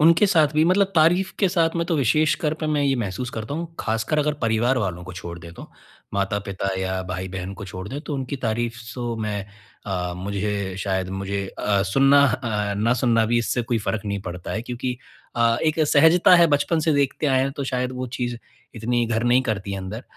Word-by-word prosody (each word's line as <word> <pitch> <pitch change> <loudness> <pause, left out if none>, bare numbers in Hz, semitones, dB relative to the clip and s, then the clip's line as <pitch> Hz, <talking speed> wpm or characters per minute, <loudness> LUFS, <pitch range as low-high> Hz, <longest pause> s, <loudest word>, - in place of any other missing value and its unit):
उनके 165 +5 +6
साथ 160 -6 +4
भी 155 +1 +4
मतलब 190 +3 +4
तारीफ़ 175 +4 +3
के 195 - +3
साथ 170 -3 +2
में 170 - 0
तो 170 - 0
विशेषकर 150 +3 +2
पे 155 - -1
मैं 150 -1 +1
ये 140 -1 +2
महसूस 120 +3 -3
करता 110 +5 -5
हूँ, 165 +1 -5
खासकर 115 +7 -1
अगर 150 0 +1
परिवार 115 +3 +2
वालों 90 -6 -3
को 95 - -8
छोड़ 85 0 -7
दे 85 -1 -11
तो। - - -11 0.4
माता-पिता 100 0 -2
या 95 0 -2
भाई-बहन 95 +1 -4
को 100 - -8
छोड़ 95 -1 -7
दें 140 +5 -5
तो 150 -1 -5
उनकी 135 0 -3
तारीफ़ 115 +1 -1 0.2
तो 120 -2 -3
मैं 105 -3 -3 0.4
अ, 90 -3 -2
मुझे 100 0 -3
शायद 95 -1 -1
मुझे 100 +1 -3
अ, 100 -2 +1
सुनना 135 +8 +5
अ, 110 -5 -1
ना 110 +4 +2
सुनना 115 -2 +2
भी 120 +1 +2
इससे 120 +1 0
कोई 115 0 -1
फ़र्क 110 -1 -2
नहीं 100 -1 -2
पड़ता 90 -1 -6
है 115 - -2
क्योंकि 125 +1 -4 0.4
अ, 115 0 +3
एक 160 0 +1
सहजता 160 +5 +6
है 170 -1 +6
बचपन 155 +2 +1
से 160 0 +2
देखते 140 +2 +1
आए 130 -2 +3
हैं 135 - 0
तो 140 0 -4
शायद 125 -1 -2
वो 130 0 -4
चीज़, 120 -1 -2 0.4
इतनी 120 +1 0
घर 115 0 0
नहीं 125 +2 +4
करती 100 -5 -3
है 100 - -3
अंदर 95 +5 -6
120 Hz, 210 wpm, -23 LUFS, 100-145 Hz, 0.4 s, उनके